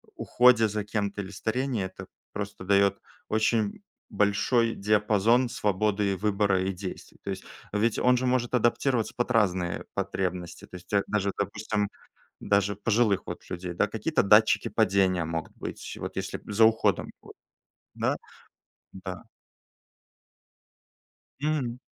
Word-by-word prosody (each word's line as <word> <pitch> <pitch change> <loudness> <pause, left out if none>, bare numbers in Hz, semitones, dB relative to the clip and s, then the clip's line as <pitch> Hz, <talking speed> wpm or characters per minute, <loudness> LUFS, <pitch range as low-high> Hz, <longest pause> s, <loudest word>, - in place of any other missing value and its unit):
уходе 120 -2 +4
за 105 0 -3
кем-то 100 -1 -2
или 95 +1 -8
старении, 115 +2 -1
это 95 0 -7 0.3
просто 100 -2 -6
дает 100 0 +3 0.3
очень 110 - +1 0.3
большой 105 +3 +2
диапазон 105 +4 +3
свободы 105 -2 0
выбора 100 -2 +1
и 95 +1 -1
действий, 95 0 -8
то - - -6
есть - - -5 0.3
ведь 105 +2 +1
он 125 0 +4
же 130 - -1
может 125 -1 0
адаптироваться 120 0 +1
под 120 +1 -1
разные 95 -6 +1
потребности, 90 -2 -3
то - - -12
есть 90 - -11
тя 100 -1 +2
даже, 100 -2 0
допустим, 105 0 -1 0.5
даже 100 0 +1
пожилых 105 -1 +1
вот - - -6
людей, 90 -1 -5
да. - - +1
Какие-то 110 +7 0
датчики 105 +2 +5
падения 95 -3 +2
могут 80 0 -4
быть. - - -7
Вот - - -5
если - - -4
за 110 +2 +4
уходом, 110 0 +2
вот, - - -14 0.6
да, - - 0 0.8
да. 95 -1 -7 2.2
Мгм. 140 -5 -1
105 Hz, 130 wpm, -27 LUFS, 95-115 Hz, 2.2 s, датчики